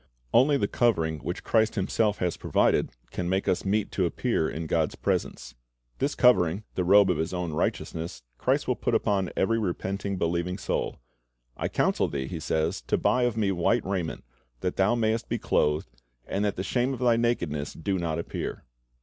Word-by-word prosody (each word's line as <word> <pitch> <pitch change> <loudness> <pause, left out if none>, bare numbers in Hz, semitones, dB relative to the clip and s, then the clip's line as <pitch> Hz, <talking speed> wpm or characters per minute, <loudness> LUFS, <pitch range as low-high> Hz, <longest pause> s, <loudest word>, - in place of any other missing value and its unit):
Only 140 +3 +5
the 100 - 0
covering 80 -12 +1
which 85 +5 -5
Christ 110 -1 +2
Himself 105 +1 +1
has 90 -2 -1
provided, - - +2 0.2
can 90 -1 -3
make 95 +1 0
us 90 - +1
meet 105 +2 0
to 95 -3 +1
appear 100 -4 0
in 80 +2 -5
God's 80 -1 0
presence. - - -2 0.5
This 140 +2 0
covering, 100 - +4
the 90 - 0
robe 100 +1 +6
of 85 - -1
His 80 +3 -2
own 90 -3 -3
righteousness, 80 0 -3 0.2
Christ - - +1
will - - +2
put - - 0
upon 95 -3 +1
every 115 +4 +2
repenting, 100 0 -2
believing 85 +2 -1
soul. - - -2 0.6
'T - - 0
counsel - - +1
thee," 70 -2 -3
He 85 +3 -5
says, 80 +4 -1
"to - - +2
buy 125 0 +2
of 120 -2 -1
Me... 100 -3 +2
white 95 +6 +1
raiment, 90 -7 -3 0.4
that 90 - -1
thou 100 +5 +3
mayest 110 -1 0
be - - 0
clothed, 75 -2 +1 0.3
and 100 - -2
that 100 - 0
the 95 - -3
shame 125 +5 0
of - - -10
thy 120 -2 +4
nakedness 85 -12 -1
do 95 +3 -2
not 80 -2 -1
appear." 85 - -4
95 Hz, 185 wpm, -27 LUFS, 85-110 Hz, 0.6 s, robe